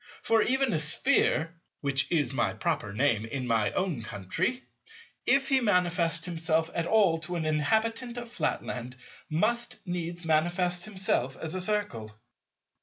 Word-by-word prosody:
For 225 Hz, -1 st, +3 dB
even 265 Hz, -1 st, +2 dB
a 160 Hz, -, +1 dB
Sphere—which 155 Hz, -, +1 dB
is 145 Hz, -7 st, +1 dB
my -, -, 0 dB
proper 155 Hz, -, -2 dB
name 110 Hz, 0 st, +1 dB
in 125 Hz, +3 st, -4 dB
my 110 Hz, -4 st, +1 dB
own 180 Hz, -10 st, -1 dB
country—if 255 Hz, -, -2 dB
he 270 Hz, -1 st, +4 dB
manifest 175 Hz, -5 st, +1 dB
himself 165 Hz, -2 st, 0 dB
at 170 Hz, 0 st, -1 dB
all 195 Hz, -7 st, +3 dB
to 170 Hz, +2 st, -5 dB
an 165 Hz, -2 st, -2 dB
inhabitant 220 Hz, -, 0 dB
of 240 Hz, 0 st, -5 dB
Flatland—must 155 Hz, -, -2 dB
needs 175 Hz, -1 st, -4 dB
manifest 175 Hz, +3 st, +1 dB
himself 185 Hz, -, -1 dB
as 160 Hz, -1 st, -5 dB
a 185 Hz, -, -1 dB
Circle. 130 Hz, -, -2 dB
170 Hz, 130 wpm, -28 LUFS, 145-210 Hz, -, he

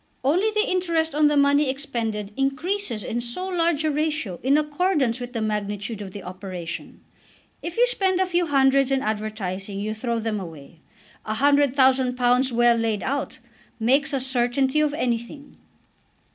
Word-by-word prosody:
Only 350 Hz, +11 st, +2 dB
the 430 Hz, +2 st, +1 dB
interest 335 Hz, -4 st, 0 dB
on 300 Hz, 0 st, +4 dB
the 295 Hz, 0 st, +2 dB
money 285 Hz, 0 st, +4 dB
expended 230 Hz, -7 st, -3 dB
increases 275 Hz, -, -1 dB
in 240 Hz, -, -3 dB
so 240 Hz, +11 st, -4 dB
large 340 Hz, -4 st, +1 dB
a 310 Hz, -, +1 dB
ratio 300 Hz, -, -2 dB
in 275 Hz, +3 st, +3 dB
accordance 300 Hz, -5 st, 0 dB
with 245 Hz, 0 st, -7 dB
the 225 Hz, -2 st, -2 dB
magnitude 210 Hz, 0 st, -3 dB
of 200 Hz, -, -6 dB
the 195 Hz, 0 st, -9 dB
operation! 180 Hz, -2 st, -7 dB, 0.6 s
If 340 Hz, +3 st, -6 dB
you 485 Hz, -, +6 dB
spend 385 Hz, -7 st, +1 dB
a 375 Hz, -, +3 dB
few 350 Hz, -1 st, 0 dB
hundreds 275 Hz, -1 st, +3 dB
in 270 Hz, 0 st, +1 dB
advertising 210 Hz, -2 st, -3 dB
you 215 Hz, +2 st, -2 dB
throw 235 Hz, +1 st, -2 dB
them 220 Hz, -2 st, -2 dB
away. 165 Hz, -3 st, -10 dB, 0.4 s
A 215 Hz, -, -3 dB
hundred 280 Hz, +1 st, +3 dB
thousand 260 Hz, -2 st, +3 dB
pounds 250 Hz, +1 st, +3 dB
well 240 Hz, 0 st, +4 dB
laid 225 Hz, -2 st, -1 dB
out 270 Hz, -1 st, -3 dB, 0.4 s
makes 265 Hz, +5 st, +2 dB
a 275 Hz, -, 0 dB
certainty 260 Hz, +2 st, +1 dB
of 300 Hz, -1 st, +1 dB
anything." 250 Hz, +2 st, -3 dB
260 Hz, 165 wpm, -24 LUFS, 220-300 Hz, 0.6 s, you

